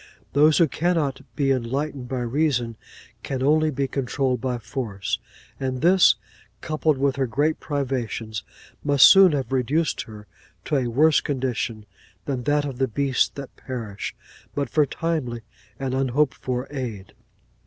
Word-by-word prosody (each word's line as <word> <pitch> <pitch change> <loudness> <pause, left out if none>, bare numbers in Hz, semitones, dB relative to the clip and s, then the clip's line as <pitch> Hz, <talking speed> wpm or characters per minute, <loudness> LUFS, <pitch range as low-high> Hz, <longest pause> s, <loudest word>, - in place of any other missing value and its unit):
Those 150 +3 +5
who 170 - +5
cannot 155 -4 0
be 140 -2 +1
enlightened 135 +2 -2
by 130 0 -3
reason, 120 -2 0 0.5
can 130 -1 -3
only 155 +2 +3
be 140 -1 -1
controlled 130 -1 -1
by 125 -2 -1
force; 115 -4 -3 0.4
and 130 -1 -2
this, 175 - +6 0.4
coupled 155 +1 0
with 135 0 +1
her 135 -1 +1
great 145 +7 0
privations, 125 -7 -3 0.4
must 145 -2 +6
soon 190 -4 +8
have 135 -2 -2
reduced 135 +5 +1
her 105 -1 -11 0.4
to 150 - +1
a 130 -2 0
worse 150 +6 +4
condition 125 -5 -2 0.4
than 130 -4 -3
that 145 0 +2
of 135 -3 -6
the 135 - +2
beasts 130 +2 +1
that 140 -2 -8
perish, 115 -6 -6 0.4
but 140 -4 -2
for 150 -2 +3
timely 140 -8 -2 0.4
and 135 -1 -2
unhoped 135 +2 +1
for 125 -2 -3
aid. 115 -9 -5
135 Hz, 145 wpm, -24 LUFS, 125-145 Hz, 0.5 s, soon